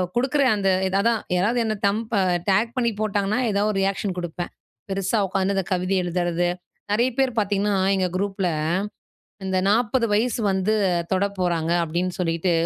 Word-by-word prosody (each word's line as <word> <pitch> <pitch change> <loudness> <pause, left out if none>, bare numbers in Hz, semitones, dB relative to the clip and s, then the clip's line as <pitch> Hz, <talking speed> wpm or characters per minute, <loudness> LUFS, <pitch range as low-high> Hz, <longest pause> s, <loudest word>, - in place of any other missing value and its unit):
குடுக்குற 265 +4 +1
அந்த 195 -2 +1 0.2
இது 190 - -2
அதான் 230 +1 +1
யாராவது 210 +7 +1
என்னை 215 -1 -1
தம்ப் 220 +3 -2
அ - - +2 0.3
டேக் 215 +5 +2
பண்ணி 235 -2 +2
போட்டாங்கன்னா, 205 +1 0
எதா 200 0 +1
ஒரு 200 - -3
ரியாக்ஷன் 195 -1 -1
குடுப்பேன். 175 0 -5 0.4
பெருசா 195 +3 0
உட்காந்து 195 +1 0
இந்த 195 - +1
கவிதை 185 +1 0
எழுதுறது, 175 0 0 0.4
நெறைய 235 +5 +3
பேர் 265 -1 +3
பார்த்தீங்கன்னா, 205 0 0 0.2
எங்க 185 -1 +1
குரூப்பில 195 -1 -1 1.0
இந்த 190 -1 0
40 230 +2 +2
வயசு 230 +2 +1
வந்து 190 +3 +1 0.4
தொட 190 +1 +2
போறாங்க 170 -3 0
அப்பிடின்னு 175 +3 -2
சொல்லிட்டு 170 +1 0
195 Hz, 155 wpm, -23 LUFS, 185-215 Hz, 1.0 s, நெறைய